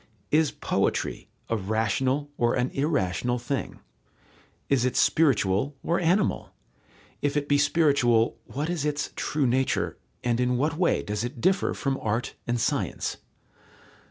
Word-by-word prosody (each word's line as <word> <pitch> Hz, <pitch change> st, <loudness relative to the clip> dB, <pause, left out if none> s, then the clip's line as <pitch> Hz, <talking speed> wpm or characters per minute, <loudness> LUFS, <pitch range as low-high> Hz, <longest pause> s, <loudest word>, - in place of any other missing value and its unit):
Is 155 Hz, 0 st, +4 dB
poetry -, -, -1 dB, 0.2 s
a 115 Hz, -, 0 dB
rational 115 Hz, +7 st, 0 dB
or 120 Hz, -3 st, +1 dB
an 125 Hz, +1 st, 0 dB
irrational 125 Hz, -, 0 dB
thing? 125 Hz, +3 st, -4 dB, 0.9 s
Is 135 Hz, -3 st, +2 dB
it 130 Hz, -, 0 dB
spiritual 135 Hz, -3 st, +2 dB
or 170 Hz, -, +1 dB
animal? 180 Hz, +4 st, +1 dB, 0.7 s
If 145 Hz, 0 st, 0 dB
it 145 Hz, -1 st, -1 dB
be 145 Hz, 0 st, +3 dB
spiritual, 140 Hz, -7 st, +3 dB
what 145 Hz, +3 st, -3 dB
is 170 Hz, -4 st, -2 dB
its 150 Hz, 0 st, -1 dB
true 150 Hz, -2 st, 0 dB
nature, 130 Hz, +2 st, 0 dB, 0.2 s
and 120 Hz, -1 st, +1 dB
in 125 Hz, 0 st, +1 dB
what 150 Hz, +5 st, 0 dB
way 175 Hz, +1 st, +1 dB
does 105 Hz, +1 st, -3 dB
it 120 Hz, +1 st, -5 dB
differ 185 Hz, +9 st, +2 dB
from 135 Hz, -1 st, -1 dB
art 110 Hz, +3 st, -1 dB
and 120 Hz, 0 st, 0 dB
science? -, -, -1 dB
135 Hz, 140 wpm, -26 LUFS, 120-150 Hz, 0.9 s, Is